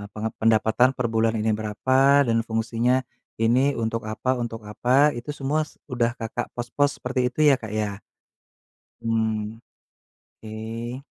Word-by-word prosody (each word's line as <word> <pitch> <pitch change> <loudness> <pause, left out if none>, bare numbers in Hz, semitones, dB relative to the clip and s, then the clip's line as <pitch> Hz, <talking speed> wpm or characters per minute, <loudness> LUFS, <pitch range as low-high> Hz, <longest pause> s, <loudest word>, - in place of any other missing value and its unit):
pengep 110 +1 -4
pendapatan 115 +3 +4
per 125 -3 -2
bulan 115 0 +1
ini 110 0 +1
berapa 130 +6 +3
dan 115 -1 +2
fungsinya 115 +3 0 0.3
ini 125 +5 +2
untuk 115 0 -1
apa, 110 +4 -1
untuk 115 -3 -5
apa, 130 +7 +3
itu 120 +5 -6
semua 145 +2 -1
es 155 - -11
udah 120 -4 0
Kakak 115 +1 -4
pos-pos 140 +4 0
seperti 125 +1 -2
itu, 155 +4 +2
ya, 145 - +7
Kak, 115 -5 -6
ya? 105 -1 -3 1.0
Mmm. 110 -1 -1 0.9
Ke. 115 +4 -6
115 Hz, 140 wpm, -24 LUFS, 110-130 Hz, 1.0 s, ya